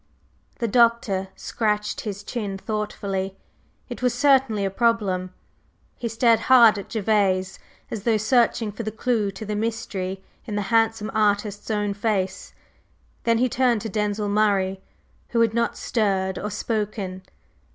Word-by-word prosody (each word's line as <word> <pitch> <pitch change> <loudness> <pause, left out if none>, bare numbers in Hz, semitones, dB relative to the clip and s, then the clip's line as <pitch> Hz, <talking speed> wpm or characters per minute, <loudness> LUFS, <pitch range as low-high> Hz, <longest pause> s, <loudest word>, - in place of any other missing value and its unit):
The 235 - -1
Doctor 230 -4 +2
scratched 210 -2 -1
his 205 -2 -5
chin 205 -3 -4
thoughtfully. 195 -2 -3 0.5
It - - -7
was 250 -1 +1
certainly 255 -6 +3
a 195 - -1
problem. 195 -5 0 0.6
He 240 - -4
stared 230 0 +3
hard 235 -5 +7
at 200 - -9
Gervase, 195 -3 +1 0.3
as 220 - -4
though 225 +1 +2
searching 230 0 +2
for 205 - -6
the 215 - -3
clue 220 -1 0
to 195 +2 -7
the 210 0 -3
mystery 195 -4 -3 0.2
in 210 - -4
the 205 - 0
handsome 225 -1 +2
artist's 205 -1 0
own 205 -2 0
face. 200 -2 -2 0.7
Then 230 -1 +3
he 250 +2 +3
turned 245 -3 +1
to 225 - -4
Denzil 210 0 -1
Murray, 200 -2 +1 0.5
who 235 - +1
had 225 -1 +3
not 235 0 0
stirred 190 -4 0
or 210 - -3
spoken. 205 -3 -3
210 Hz, 145 wpm, -24 LUFS, 200-230 Hz, 0.7 s, hard